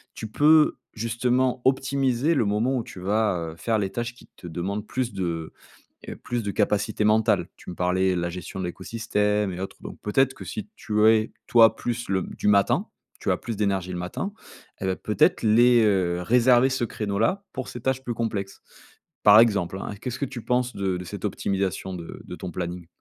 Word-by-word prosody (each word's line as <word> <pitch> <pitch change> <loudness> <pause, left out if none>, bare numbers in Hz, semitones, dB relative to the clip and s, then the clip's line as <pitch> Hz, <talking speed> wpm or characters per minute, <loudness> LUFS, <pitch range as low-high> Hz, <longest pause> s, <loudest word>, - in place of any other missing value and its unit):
tu 110 - -6
peux 150 +7 +4 0.2
justement 125 +3 0
optimiser 135 +2 +2
le 125 - +2
moment 110 +6 +1
où 120 - -2
tu 95 - -11
vas, 105 +1 +1 0.2
heu, - - -12
faire 110 +4 0
les 95 -2 -2
tâches 120 0 -3
qui - - -18
te 90 - -10
demandent 95 +5 -4
plus 125 -2 -2
de, 85 -4 -3 0.6
heu, - - -6
plus 120 -1 -3
de 105 - -2
capacités 105 +1 0
mentales. 110 +1 +3
Tu - - -10
me 90 - -6
parlais 90 +1 +1
de - - 0
la 85 0 -2
gestion 90 +2 -7
de 95 - -3
l'écosystème 105 +2 -1
et 90 - -6
autres, 95 - -6
donc - - -9
peut-être 135 +5 +2
que - - -10
si 215 -2 -6
tu 105 0 +1
es, 110 0 +4
toi, 115 -2 +6
plus 120 0 -3
le 95 -1 +1
m - - -6
du - - 0
matin, 100 -1 +3 0.3
tu - - -1
as - - +3
plus 115 - -5
d'énergie 100 -3 -1
le - - -4
matin 90 - -4 0.5
et - - -4
bah 95 - 0
peut-être 105 - +2
les, 120 +2 +5
heu 95 -5 +2
réserver 125 +5 +4
ce 130 -2 -1
créneau 105 -3 -3
là 200 - +1
pour 130 - -5
ces 120 - -7
tâches 130 +2 -1
plus 120 - -2
complexes. 105 -4 -3 0.6
Par 105 +1 +9
exemple 100 -5 +2
hein, 105 - -5
qu'est-ce 125 0 -4
que 140 - -1
tu 125 -3 -8
penses 125 0 0
de 95 -2 -1
de 90 - -6
cette - - -8
optimisation 95 -1 -2
de 85 -2 -8
de - - -8
ton 90 - -6
planning? 90 0 -5
105 Hz, 210 wpm, -25 LUFS, 95-120 Hz, 0.6 s, Par